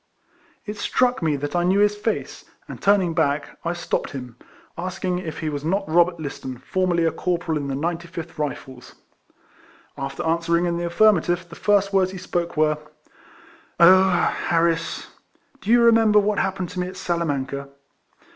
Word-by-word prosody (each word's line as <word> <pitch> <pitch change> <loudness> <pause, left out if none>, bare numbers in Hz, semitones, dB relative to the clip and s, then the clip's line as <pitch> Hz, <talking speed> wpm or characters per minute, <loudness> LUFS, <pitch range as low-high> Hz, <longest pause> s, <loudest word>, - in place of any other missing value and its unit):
It 210 0 -6
struck 250 +3 +1
rae 155 -3 +1
that 145 +4 -4
I 175 - +2
knew 185 +3 +2
his 205 0 +3
face, 215 +1 -3 0.2
and, - - -9
turning 195 -4 +3
back, 145 -1 -1
I 170 - -1
stopped 175 -1 -3
him, 125 -4 -7 0.4
asking 180 0 -3
if 160 -4 -6
he 160 - -2
was 145 -1 -4
not 195 +5 -1
Robert 170 +1 +3
Listen, 135 -4 -6
formerly 175 +5 0
a 165 - +2
cor 180 -1 -1
poral 165 -2 -3
in 145 -1 -3
the 135 - -2
Ninty 170 +4 -3
fifth 165 -2 -8
Rifles? 135 -3 -6 1.0
After 135 0 -5
answer 170 +1 +1
ing 175 - 0
in 170 -1 -1
the 175 0 -2
affirmative, 180 -2 +3
the 170 - -12
first 200 0 +2
words 190 -1 +3
he 190 - -8
spoke 175 -2 -3
were, 155 -1 +2 0.6
" 330 - -26
Oh! 185 +2 +7
Harris! 170 -2 0 0.5
do 205 - -7
you 235 +1 +6
remember 225 -2 +5
what 210 0 +2
happened 190 -2 -2
to 185 - -6
me 180 - -1
at 185 0 -9
Salamanca?" 140 -6 -2
175 Hz, 175 wpm, -23 LUFS, 160-190 Hz, 1.0 s, Oh